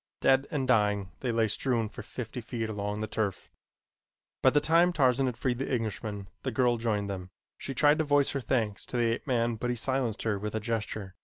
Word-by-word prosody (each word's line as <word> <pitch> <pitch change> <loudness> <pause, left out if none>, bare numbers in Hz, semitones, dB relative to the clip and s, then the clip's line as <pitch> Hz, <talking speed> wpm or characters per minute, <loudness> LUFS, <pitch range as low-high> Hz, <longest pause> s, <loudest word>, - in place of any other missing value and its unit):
Dead 135 +1 +3
and 140 -5 -1
dying 105 -5 +2
they 125 - -1
lay 115 -1 +2
strewn 115 +1 0
for 105 - -9
fifty 125 0 -6
feet 115 -1 -3
along 105 0 -3
the - - 0
turf. 105 -4 -3 0.9
By - - +6
the 145 - +3
time 165 +4 +4
Tarzan 135 -4 +3
had 125 -2 -3
freed 125 -1 -1
the 135 - -3
Englishman 105 -4 -3
the - - -2
girl 120 -2 +2
joined 110 -3 -1
them. 95 -2 -5 0.3
She 135 - -5
tried 150 +3 +4
to - - +3
voice 145 -2 +3
her 140 - -2
thanks 110 -5 -1
to 125 - -3
the 120 -1 +2
ape 115 - -6
man 120 -3 +1
but 120 +3 -2
he 125 - 0
silenced 125 -2 -1
her 105 -3 0
with 105 +2 -4
a - - +1
gesture. 105 -3 -3
115 Hz, 220 wpm, -29 LUFS, 105-130 Hz, 0.9 s, By